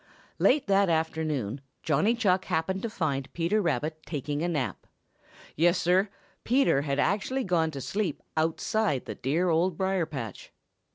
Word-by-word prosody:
Late 280 Hz, +1 st, +4 dB
that 195 Hz, -1 st, +3 dB
afternoon 155 Hz, -7 st, -1 dB, 0.2 s
Johnny 160 Hz, +9 st, +2 dB
Chuck 190 Hz, -5 st, +2 dB
happened 190 Hz, +4 st, -1 dB
to 230 Hz, -, -2 dB
find 140 Hz, -9 st, -2 dB
Peter 175 Hz, +6 st, +1 dB
Rabbit 155 Hz, -2 st, -1 dB
taking 145 Hz, -1 st, -3 dB
a 170 Hz, -, 0 dB
nap. 150 Hz, -7 st, -2 dB, 0.7 s
Yes, 175 Hz, +3 st, +3 dB
Sir, 185 Hz, +4 st, +3 dB, 0.3 s
Peter 250 Hz, -, +3 dB
had 140 Hz, -1 st, -1 dB
actually 210 Hz, -, +1 dB
gone 170 Hz, -5 st, +1 dB
to 140 Hz, -3 st, -6 dB
sleep 190 Hz, -, -2 dB
outside 160 Hz, -, 0 dB
the 110 Hz, -, -5 dB
dear 155 Hz, -, 0 dB
Old 170 Hz, +1 st, +2 dB
Briar 190 Hz, -3 st, 0 dB
patch. 130 Hz, -8 st, -7 dB
165 Hz, 150 wpm, -28 LUFS, 150-190 Hz, 0.7 s, Late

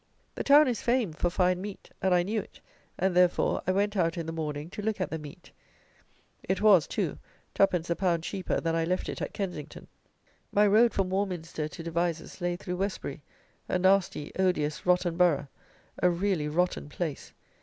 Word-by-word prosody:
The -, -, -4 dB
town 290 Hz, +1 st, +7 dB
is 240 Hz, -4 st, -1 dB
famed 235 Hz, -10 st, 0 dB
for 175 Hz, -, +2 dB
fine 180 Hz, 0 st, +1 dB
meat; 200 Hz, 0 st, -8 dB
and 190 Hz, -, +2 dB
I 175 Hz, -1 st, +4 dB
knew 215 Hz, +4 st, -1 dB
it, -, -, -17 dB, 0.4 s
and, 190 Hz, 0 st, +1 dB
therefore, 180 Hz, -1 st, +3 dB
I -, -, +4 dB
went 205 Hz, +2 st, 0 dB
out 170 Hz, -2 st, +1 dB
in 165 Hz, -, -3 dB
the 165 Hz, -, -4 dB
morning 150 Hz, -2 st, -4 dB
to 210 Hz, -, -6 dB
look 215 Hz, 0 st, -2 dB
at 185 Hz, -, -2 dB
the 160 Hz, -, -3 dB
meat. 150 Hz, +4 st, -12 dB, 0.9 s
It 190 Hz, -, -1 dB
was, 200 Hz, -8 st, +5 dB
too, -, -, -2 dB, 0.3 s
2_d._ 180 Hz, -4 st, +2 dB
a 170 Hz, -, 0 dB
pound 170 Hz, -3 st, 0 dB
cheaper 190 Hz, +1 st, -2 dB
than 165 Hz, -1 st, -1 dB
I 165 Hz, -, +1 dB
left 180 Hz, +3 st, -1 dB
it -, -, -5 dB
at -, -, -3 dB
Kensington. 180 Hz, -7 st, -6 dB, 0.7 s
My 205 Hz, +1 st, +4 dB
road 220 Hz, +3 st, +5 dB
from 190 Hz, -2 st, -1 dB
Warminster 180 Hz, -5 st, -2 dB
to 165 Hz, -, -9 dB
Devizes 170 Hz, 0 st, -2 dB
lay 175 Hz, 0 st, 0 dB
through 180 Hz, 0 st, -5 dB
Westbury, 185 Hz, -7 st, -3 dB, 0.5 s
a -, -, +2 dB
nasty 185 Hz, -5 st, +2 dB
odious 165 Hz, -5 st, 0 dB
rotten 180 Hz, -1 st, +2 dB
borough, 155 Hz, -6 st, +3 dB, 0.5 s
a 180 Hz, -, +5 dB
really 175 Hz, -3 st, 0 dB
rotten 170 Hz, -1 st, -1 dB
place. 155 Hz, -2 st, -4 dB
180 Hz, 185 wpm, -28 LUFS, 165-195 Hz, 0.9 s, town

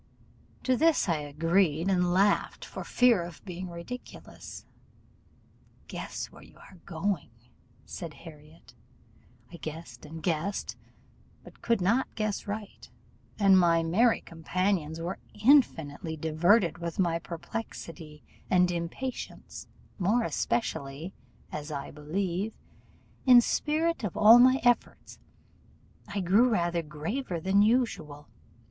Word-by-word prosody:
To 255 Hz, -, +2 dB
this 320 Hz, 0 st, +3 dB
I 165 Hz, -3 st, +1 dB
agreed, 165 Hz, +3 st, +1 dB
and 180 Hz, -2 st, +2 dB
laughed 200 Hz, +3 st, +1 dB
for -, -, -7 dB
fear 245 Hz, -6 st, +3 dB
of 170 Hz, +3 st, -9 dB
being 180 Hz, -1 st, -6 dB
ridiculous. 170 Hz, +9 st, -9 dB, 1.2 s
'Guess -, -, -6 dB
where -, -, -15 dB
you -, -, -17 dB
are 185 Hz, -, -16 dB
going,' 170 Hz, -3 st, -2 dB, 0.6 s
said 165 Hz, -4 st, -7 dB
Harriot, 155 Hz, -1 st, -15 dB, 0.8 s
I 170 Hz, -, -9 dB
guessed 155 Hz, -6 st, -8 dB
and 160 Hz, +1 st, -9 dB
guessed, 175 Hz, +3 st, -2 dB, 0.7 s
but -, -, -16 dB
could 230 Hz, -4 st, +1 dB
not 230 Hz, +9 st, +1 dB
guess 215 Hz, -2 st, -2 dB
right; 205 Hz, 0 st, -7 dB, 0.5 s
and 195 Hz, -2 st, +6 dB
my 170 Hz, -2 st, +3 dB
merry 220 Hz, +9 st, +3 dB
companions 165 Hz, -1 st, -2 dB
were 175 Hz, +3 st, -4 dB, 0.2 s
infinitely 165 Hz, -, +3 dB
diverted 170 Hz, +4 st, +2 dB
with 170 Hz, -1 st, -5 dB
my 170 Hz, -3 st, +1 dB
perplexity 165 Hz, -3 st, -8 dB, 0.3 s
and 180 Hz, -1 st, +4 dB
impatience, 175 Hz, +10 st, -6 dB, 0.3 s
more 210 Hz, +6 st, +2 dB
especially 150 Hz, -, -2 dB, 0.4 s
as, 150 Hz, +1 st, -6 dB
I 140 Hz, -2 st, -5 dB
believe, 180 Hz, +7 st, -3 dB, 0.7 s
in 250 Hz, -1 st, +9 dB
spite 315 Hz, +5 st, 0 dB
of 205 Hz, -, -3 dB
all 220 Hz, +3 st, +8 dB
my 255 Hz, +2 st, +6 dB
efforts, 245 Hz, -1 st, 0 dB, 0.9 s
I 200 Hz, -, -3 dB
grew 205 Hz, +8 st, +4 dB
rather 175 Hz, -6 st, 0 dB
graver 165 Hz, -, -4 dB
than 190 Hz, +4 st, +3 dB
usual. 210 Hz, -, 0 dB
180 Hz, 115 wpm, -28 LUFS, 160-215 Hz, 1.2 s, in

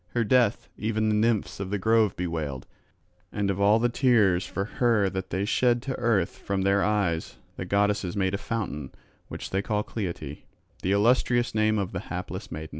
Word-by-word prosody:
Her 120 Hz, -, +2 dB
death 120 Hz, -1 st, +2 dB
even 110 Hz, 0 st, 0 dB
the -, -, +2 dB
nymphs 110 Hz, -1 st, 0 dB
of 95 Hz, -1 st, -4 dB
the 105 Hz, -, -1 dB
grove 110 Hz, 0 st, +2 dB
bewailed; 80 Hz, -7 st, -4 dB, 0.7 s
and 100 Hz, -1 st, 0 dB
of 100 Hz, +1 st, -3 dB
all 105 Hz, +2 st, +5 dB
the 120 Hz, +2 st, +2 dB
tears 115 Hz, -8 st, +3 dB
for 95 Hz, -, -3 dB
her 110 Hz, -4 st, +1 dB
that 95 Hz, -1 st, -4 dB
they 95 Hz, +3 st, -1 dB
shed 120 Hz, +3 st, +2 dB
to 135 Hz, -, -3 dB
earth 115 Hz, -8 st, 0 dB
from 100 Hz, -1 st, -2 dB
their 100 Hz, 0 st, +3 dB
eyes 100 Hz, -6 st, 0 dB, 0.2 s
the -, -, -5 dB
goddesses 100 Hz, -1 st, 0 dB
made 95 Hz, -1 st, +1 dB
a 100 Hz, -, -1 dB
fountain, 95 Hz, -, -4 dB, 0.4 s
which -, -, -7 dB
they 95 Hz, -, +1 dB
call 105 Hz, +1 st, -1 dB
Cleite, 85 Hz, -11 st, -5 dB, 0.4 s
the 95 Hz, -, 0 dB
illustrious 120 Hz, +3 st, +2 dB
name 110 Hz, 0 st, +2 dB
of 100 Hz, -3 st, -2 dB
the 85 Hz, -, -3 dB
hapless 90 Hz, +2 st, -6 dB
maid. 80 Hz, 0 st, -6 dB
100 Hz, 190 wpm, -26 LUFS, 95-110 Hz, 0.7 s, all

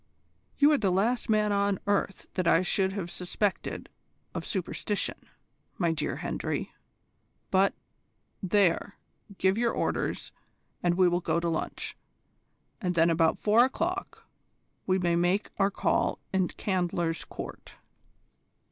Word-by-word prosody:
"You 290 Hz, +1 st, +6 dB
are 295 Hz, -, +3 dB
the 200 Hz, -, +2 dB
last 215 Hz, +7 st, +1 dB
man 215 Hz, -1 st, +3 dB
on 200 Hz, -1 st, +2 dB
earth 200 Hz, -2 st, 0 dB
that 185 Hz, -3 st, -1 dB
I 165 Hz, +2 st, +5 dB
should 190 Hz, +1 st, +1 dB
have 185 Hz, -4 st, -4 dB
suspected 185 Hz, +2 st, -2 dB, 0.5 s
of -, -, -4 dB
superstition, 200 Hz, +2 st, -2 dB, 0.5 s
my 170 Hz, -3 st, +2 dB
dear 155 Hz, -2 st, -2 dB
Hendry. -, -, -3 dB, 0.8 s
But, 195 Hz, +1 st, +3 dB, 0.7 s
there, 200 Hz, 0 st, +2 dB, 0.4 s
give 190 Hz, +3 st, +2 dB
your 235 Hz, -1 st, +2 dB
orders, -, -, -2 dB, 0.5 s
and 175 Hz, -1 st, +2 dB
we 185 Hz, 0 st, +5 dB
will 175 Hz, 0 st, +1 dB
go 170 Hz, -, +1 dB
to 170 Hz, 0 st, -1 dB
lunch, 160 Hz, -, -3 dB, 0.9 s
and 180 Hz, -3 st, -1 dB
then 170 Hz, 0 st, +4 dB
about 165 Hz, 0 st, +3 dB
four 220 Hz, +3 st, +5 dB
o'clock 345 Hz, +8 st, -2 dB, 0.6 s
we 185 Hz, 0 st, +3 dB
may 175 Hz, -2 st, +1 dB
make 175 Hz, +4 st, +1 dB
our 195 Hz, 0 st, +4 dB
call 195 Hz, -, +1 dB, 0.2 s
in 190 Hz, -2 st, +2 dB
Candler's 175 Hz, -4 st, -1 dB
Court." -, -, -9 dB
190 Hz, 130 wpm, -28 LUFS, 175-205 Hz, 0.9 s, You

